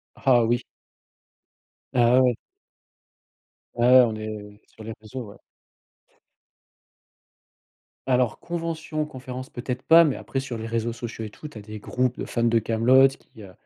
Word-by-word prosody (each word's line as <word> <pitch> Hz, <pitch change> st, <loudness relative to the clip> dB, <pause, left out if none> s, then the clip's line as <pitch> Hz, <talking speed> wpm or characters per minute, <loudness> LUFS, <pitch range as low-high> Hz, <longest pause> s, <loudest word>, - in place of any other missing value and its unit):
Ah, 125 Hz, -3 st, +3 dB
oui. 120 Hz, +2 st, 0 dB, 1.3 s
Ah, 125 Hz, +1 st, +4 dB
ouais. 125 Hz, -2 st, +3 dB, 1.4 s
Ouais, 120 Hz, 0 st, +1 dB
ouais, 130 Hz, 0 st, +8 dB
on 110 Hz, -2 st, -3 dB
est 105 Hz, -1 st, -8 dB
sur 110 Hz, -, -15 dB
les 110 Hz, 0 st, -6 dB
réseaux, 110 Hz, -1 st, -8 dB
ouais. -, -, -16 dB, 2.7 s
Alors 125 Hz, -4 st, +1 dB
convention, 165 Hz, -2 st, -4 dB
conférence 130 Hz, -2 st, -8 dB
peut-être 125 Hz, +1 st, -5 dB
pas 165 Hz, +3 st, +7 dB
mais 145 Hz, -5 st, 0 dB
après, 135 Hz, -, -4 dB
sur 130 Hz, -4 st, -5 dB
les 110 Hz, -, -5 dB
réseaux 115 Hz, 0 st, -2 dB
sociaux 115 Hz, -2 st, -7 dB
et 105 Hz, -, -9 dB
tout, 150 Hz, -, -10 dB
tu 130 Hz, -, -12 dB
as -, -, -8 dB
des 105 Hz, +1 st, -9 dB
groupes 125 Hz, +3 st, -2 dB
de -, -, -3 dB
fans 120 Hz, -, -2 dB
de 115 Hz, -1 st, +3 dB
Kaamelott 125 Hz, +5 st, +4 dB
qui, 110 Hz, -, -18 dB
heu, 95 Hz, -2 st, -11 dB
120 Hz, 155 wpm, -24 LUFS, 110-130 Hz, 2.7 s, ouais